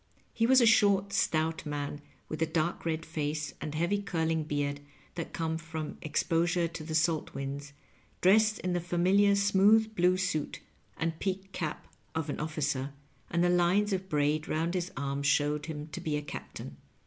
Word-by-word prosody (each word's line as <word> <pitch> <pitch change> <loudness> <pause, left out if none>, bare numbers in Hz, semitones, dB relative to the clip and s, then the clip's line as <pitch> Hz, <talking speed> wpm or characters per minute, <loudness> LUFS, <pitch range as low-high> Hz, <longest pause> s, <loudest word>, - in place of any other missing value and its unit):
He 230 0 +2
was 260 +1 +7
a - - +6
short, 200 -3 +4
stout 160 -3 +1
man, 145 -1 -4 0.3
with 155 - -5
the 160 - +1
dark 160 +2 -1
red 160 0 -1
face 150 -1 -3
and 150 - -4
heavy 175 +6 +1
curling 160 -4 -1
beard 145 -1 -1 0.3
that 165 - -5
come 160 -1 -2
from 160 -2 -6
exposure 170 +3 +1
to 165 -1 -7
the 155 0 -4
salt 160 0 +1
winds, 140 +1 -5 0.5
dressed 215 +3 +5
in 180 0 -1
the 175 - 0
familiar 185 +4 +3
smooth 205 +2 +4
blue 180 0 +3
suit 170 -5 -2 0.4
and 165 -1 -2
peaked 195 0 -3
cap 160 -5 -4 0.3
of 160 -2 -1
an - - -5
officer, 145 -3 -2 0.4
and 170 0 +1
the 175 - +4
li^es 180 +4 +3
of 190 0 -3
braid 150 0 +1
round 165 +2 -1
his 180 -1 -2
arm 140 0 -2
showed 145 +1 +1
him 150 -2 -5
to 175 - -6
be 155 -3 -1
a 150 - -4
captain. - - -8
165 Hz, 175 wpm, -30 LUFS, 150-185 Hz, 0.5 s, was